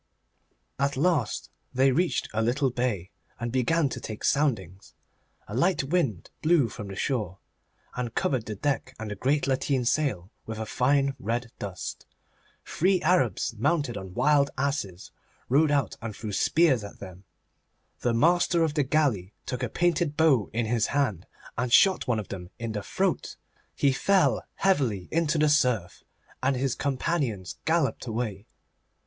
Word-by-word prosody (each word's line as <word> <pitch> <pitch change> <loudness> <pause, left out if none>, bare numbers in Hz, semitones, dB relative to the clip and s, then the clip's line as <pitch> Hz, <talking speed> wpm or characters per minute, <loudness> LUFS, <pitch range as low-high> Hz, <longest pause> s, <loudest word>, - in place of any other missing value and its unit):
At 140 0 0
last 145 -7 0 0.2
they 135 +1 +4
reached 175 +6 +1
a 110 - +1
little 130 +4 +1
bay, 115 -7 -2 0.3
and 120 0 -3
began 140 +5 +2
to 130 - -5
take 110 -2 -7
soundings. 100 - 0 0.5
A 105 - -8
light 155 - +2
wind 135 - -1
blew 155 -7 +3
from 105 +1 -7
the 95 - -7
shore, 105 -5 -2 0.6
and 120 -2 -4
covered 130 -5 0
the 105 - -4
deck 135 +5 -2
and 110 -1 -6
the - - -3
great 140 +8 +1
lateen 135 -1 0
sail 115 - 0 0.2
with 110 0 -5
a 110 - -3
fine 135 +4 +2
red 120 -1 -2
dust. 95 -3 -6 0.6
Three 185 +2 +2
Arabs 155 - +2
mounted 145 +1 0
on 95 -2 -7
wild 145 -2 +3
asses 130 - -2 0.4
rode 145 +4 +4
out 140 -5 0
and 115 -2 -5
threw 110 -2 -6
spears 135 +1 +3
at 100 - -9
them. 95 -1 -10 0.8
The 120 - +1
master 170 +4 +3
of 160 -2 0
the 150 - +2
galley 130 -10 +1
took 125 0 -4
a 125 - -1
painted 170 0 0
bow 145 -10 +4
in 115 +1 -1
his 115 0 +1
hand 130 - -1 0.3
and 125 0 -1
shot 190 +9 +5
one 120 -3 +1
of 105 - -5
them 90 -3 -7
in 115 -1 -4
the 105 -1 -3
throat. - - -1 0.4
He 140 - +3
fell 195 +7 +2
heavily 130 - +1
into 165 -1 +1
the 155 0 +4
surf, 125 -11 +1 0.4
and 135 +1 +2
his 130 0 0
companions 130 - -2
galloped 160 -5 +1
away. 110 -3 -3
125 Hz, 160 wpm, -27 LUFS, 110-150 Hz, 0.8 s, shot